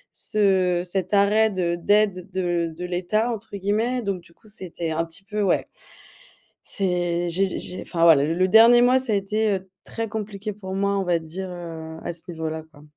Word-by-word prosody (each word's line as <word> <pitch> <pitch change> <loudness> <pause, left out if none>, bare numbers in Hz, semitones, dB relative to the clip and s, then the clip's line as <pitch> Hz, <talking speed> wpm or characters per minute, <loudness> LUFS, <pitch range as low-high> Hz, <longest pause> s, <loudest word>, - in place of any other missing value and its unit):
ce 185 -4 +2
cet 185 +1 -2
arrêt 210 +2 +4
de 180 -3 -1
«d'aide 190 0 +1
de 175 -3 -1
de 180 +2 -5
l'état» 185 +7 0
entre 205 -2 -7
guillemets. 220 +5 0
Donc 195 -3 -2
du 170 - -21
coup 220 - -31
c'était 180 -5 -5
un 165 +1 0
petit 165 +4 -5
peu 210 +1 -3
ouais, 200 - +1 1.0
c'est 175 -2 -1
j'ai 190 +1 0
j'ai 180 - -6
enfin 165 -2 -2
voilà 155 -4 +7
le 160 +3 0
le 185 +1 +2
dernier 230 +4 +7
mois 255 +1 +5
ça 255 -4 -1
a - - +3
été, 210 +2 0
heu, 190 0 -7
très 225 -1 -4
compliqué 210 -1 -5
pour 190 -2 -7
moi 200 +1 +1
on - - 0
va 175 -1 +2
dire, 180 +4 -7
heu, 165 -2 -7
à - - -3
ce 165 - -7
niveau-là 160 -1 -4
quoi. 145 -1 -17
190 Hz, 200 wpm, -23 LUFS, 175-210 Hz, 1.0 s, voilà